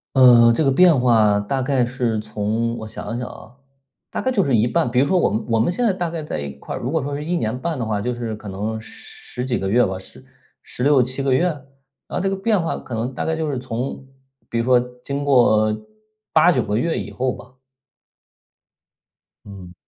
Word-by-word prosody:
呃， 120 -3 +7
这 160 - +1
个 135 - +3
变 165 0 +5
化 110 -4 +4
大 130 +6 -2
概 130 -2 +1
是 120 -3 -1
从 110 +2 -2
我 110 - -7
想 110 +2 -6
一 - - -3
想 125 - -4
啊， 120 +2 -13 0.5
大 - - -3
概 260 - 0
就 200 -7 +2
是 135 - +1
一 110 0 +3
半， 120 0 0
比 125 - +2
如 140 - +3
说 185 +4 +2
我 - - +2
们 110 +2 -2
我 115 -1 +2
们 120 +10 +2
现 245 - -2
在 225 - +4
大 175 -2 -3
概 165 -1 -4
在 150 - -4
一 70 -1 -4
块 - - -6
儿， - - -3
如 125 - -3
果 160 -3 0
说 140 +1 -3
是 150 - -5
1 175 +2 -2
年 115 -2 -2
半 165 -1 -3
的 115 - -2
话， 105 -2 -1
就 125 +4 -2
是 115 -2 -4
可 105 0 -11
能 105 +3 -3
十 110 +2 -11
十 - - 0
几 125 -2 -1
个 95 - -2
月 125 +4 +4
吧， 95 0 -4
十 95 - -13 0.4
16-17 130 0 +1
个 135 -1 +1
月？ 130 +7 +3
然 150 -6 -3 0.5
后 - - -2
这 195 - 0
个 195 - -1
变 195 -2 +1
化 165 - -2
可 125 - -8
能 120 +3 -3
大 - - -3
概 160 - 0
就 160 -1 -2
是 135 - -2
从 130 +2 -5 0.4
比 115 - -1
如 115 - 0
说 125 0 +5 0.2
经 140 +1 -3
过 110 -6 +4 0.6
8-9 155 -5 +5
个 105 +1 -2
月 160 +8 0
以 - - -5
后 130 0 -1
吧。 - - -14 1.9
嗯。 95 -3 -11
125 Hz, 240 characters per minute, -21 LUFS, 110-145 Hz, 1.9 s, 呃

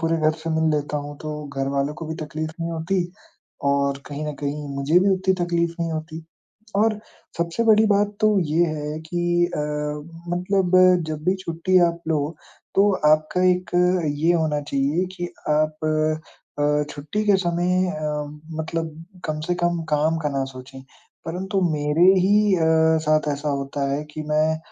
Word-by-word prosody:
पूरे 165 0 +1
घर 155 -1 +3
से 165 - -3
मिल 160 0 +3
लेता 145 0 -2
हूँ 145 0 -6
तो 155 -1 -4 0.2
घर 135 0 0
वालों 140 +2 0
को 160 - -7
भी 160 - -4
तकलीफ़ 155 +1 -4
नहीं 165 0 -2
होती 170 +3 -1 0.7
और 140 0 0
कहीं 150 +1 -5
न 150 - -3
कहीं 145 +1 -3
मुझे 140 +5 +3
भी 195 +2 +3
उतनी 190 0 +1
तकलीफ़ 170 -1 0
नहीं 165 0 -1
होती। 160 0 -6 0.5
और 215 +1 +2 0.4
सबसे 170 +7 0
बड़ी 220 -1 +6
बात 205 0 +2
तो 215 -2 +4
ये 165 +1 +2
है 150 -1 -4
कि 175 0 +1
अ, 175 - -5 0.8
मतलब 185 0 +1 0.3
जब 155 0 -5
भी 185 - +3
छुट्टी 170 +3 +2
आप 170 0 -5
लो 155 0 -1 0.4
तो 200 +1 +5 0.2
आपका 155 +4 +1
एक 180 0 -1 0.4
ये 150 +4 +2
होना 155 -3 +1
चाहिए 145 +4 0
कि 175 -1 -5 0.2
आप 155 0 +1
अ 155 0 +1 0.4
अ, 150 0 +2
छुट्टी 150 +10 -3
के 205 -2 +5
समय 180 +1 +1
अ, 155 -4 -4 0.6
मतलब 160 0 -4 0.2
कम 155 -1 -2
से 180 - +1
कम 175 -1 +1
काम 155 +2 +2
का 150 - +1
ना 135 -1 -1
सोचें। 130 +1 -10 0.4
परंतु 185 +3 -2
मेरे 150 +3 +2 0.2
ही 205 +2 +4
अ, 165 - 0 0.4
साथ 155 0 +2
ऐसा 145 +1 -3
होता 140 0 -2
है 145 +2 -1
कि 155 - -5
मैं 155 +1 +2
160 Hz, 170 wpm, -23 LUFS, 150-175 Hz, 0.8 s, बड़ी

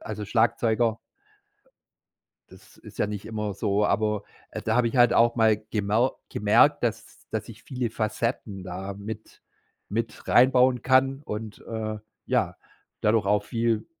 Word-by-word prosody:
also, 105 -1 -5
Schlagzeuger. 115 +1 +1 1.5
Das - - -18
ist - - -14
ja - - +2
nicht 105 -1 -6
immer 105 -3 -4
so, 100 +1 0
aber, 105 -2 0 0.3
äh, - - -5
da 110 +1 0
habe 120 -1 +3
ich 125 - -5
halt 120 -1 +6
auch 120 +1 +4
mal 110 -2 +4
gemau 110 +4 +1
gemerkt, 105 +3 +3
das - - -3
das - - -4
ich - - -12
viele 125 -3 -3
Facetten 110 -2 -3
da 95 +2 -6
mit 110 +2 -9 0.5
mit 115 +2 -4
rein 130 +2 +6
bauen 125 -1 +3
kann 135 +1 +3
und, 105 0 -6
äh, 110 -1 -4 0.3
ja, - - 0 0.4
dadurch 105 -1 +2
auch 105 0 +2
viel 115 -1 -1
110 Hz, 150 wpm, -26 LUFS, 105-120 Hz, 1.5 s, halt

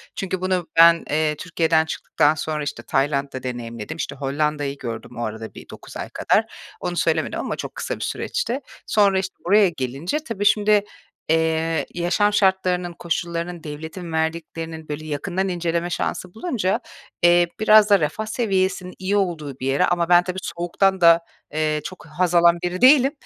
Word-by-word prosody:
Çünkü 190 -1 -3
bunu 185 -2 0
ben, 170 0 +7
eee, 155 0 +1
Türkiye'den 160 -1 +1
çıktıktan 155 -1 +1
sonra, 155 0 -3
işte, 125 -5 -5
Tayland'da 140 +1 -1
deneyimledim. 120 0 -6
İşte, - - -4
Hollanda'yı 145 0 -2
gördüm 115 -4 -7
o 120 - -3
arada 110 +1 -6
bir - - -12
9 - - -10
ay - - -5
kadar. - - +1 0.3
Onu 175 0 -4
söylemedim - - 0
ama - - -3
çok - - -7
kısa - - -3
bir - - -12
süreçti. 280 - -2 0.3
Sonra, 200 -2 +3
işte, 190 0 -5
buraya 200 +1 +5
gelince 140 - -3
tabii 230 -9 -4
şimdi, 210 0 +4 0.5
eee, 160 0 +1
yaşam 185 +4 +1
şartlarının, 185 -3 +1
koşullarının, 170 0 -3
devletin 160 +3 -7
verdiklerinin, 160 0 -3
böyle, 150 +1 -5
yakından 175 +6 -2
inceleme 170 -1 -1
şansı 180 0 -3
bulunca, 220 - -1 0.4
eee, 175 0 +5
biraz 215 -1 +6
da 200 -1 +6
refah 155 +7 -2
seviyesinin 190 -5 -1
iyi 190 +2 0
olduğu 155 -8 -2
bir 130 - -3
yere 140 +7 +3
ama 175 -1 0
ben 175 0 +6
tabii, 185 +1 -5
soğuktan 180 +3 0
da, 170 0 +7 0.3
eee, 155 -1 0
çok 185 -5 -9
haz 175 +3 -1
alan 170 0 +6
biri 180 +1 -2
değilim. 270 +1 +7
170 Hz, 165 wpm, -22 LUFS, 155-190 Hz, 0.5 s, ben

